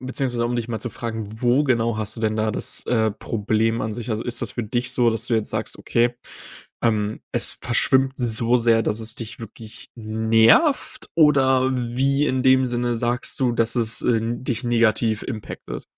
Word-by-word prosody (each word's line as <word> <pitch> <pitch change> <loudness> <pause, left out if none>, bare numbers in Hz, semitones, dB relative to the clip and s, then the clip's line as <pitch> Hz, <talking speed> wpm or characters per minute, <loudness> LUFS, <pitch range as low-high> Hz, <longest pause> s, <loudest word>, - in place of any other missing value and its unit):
beziehungsweise, 130 -2 -3
um 120 - -3
dich 120 -1 -3
mal 110 -2 -3
zu 115 +2 -5
fragen. 110 -2 -7
Wo 125 +5 +2
genau 115 -4 0
hast 110 0 -3
du - - -7
denn 110 -1 -1
da 110 0 -1
das, - - 0
äh, 110 -3 +1
Problem 110 +1 -2
an 110 0 -3
sich? 120 +2 -6
Also, 110 +1 -2
ist 120 - -1
das 115 - -3
für 120 - -4
dich 120 +3 -1
so, 120 -2 +3
dass 115 -1 -2
du 120 - 0
jetzt 110 -2 0
sagst, - - -3
okay, 120 +1 0 0.7
ähm, 110 -2 -1
es - - +4
verschwimmt 130 0 +1
so 120 0 +2
sehr, 115 -1 +2
dass 105 +1 -2
es 110 0 -2
dich 115 0 -6
wirklich 110 0 -8
nervt, 110 - +2
oder 130 -4 +3
wie 130 +4 0
in 130 -2 -1
dem 130 0 +4
Sinne 120 0 -2
sagst 120 +3 0
du, 125 - +2
dass 115 0 +3
es, 115 -1 +7
äh, 115 -2 +1
dich 120 +1 -3
negativ 115 -2 +1
impacted. 110 -5 -7
115 Hz, 190 wpm, -21 LUFS, 110-125 Hz, 0.7 s, es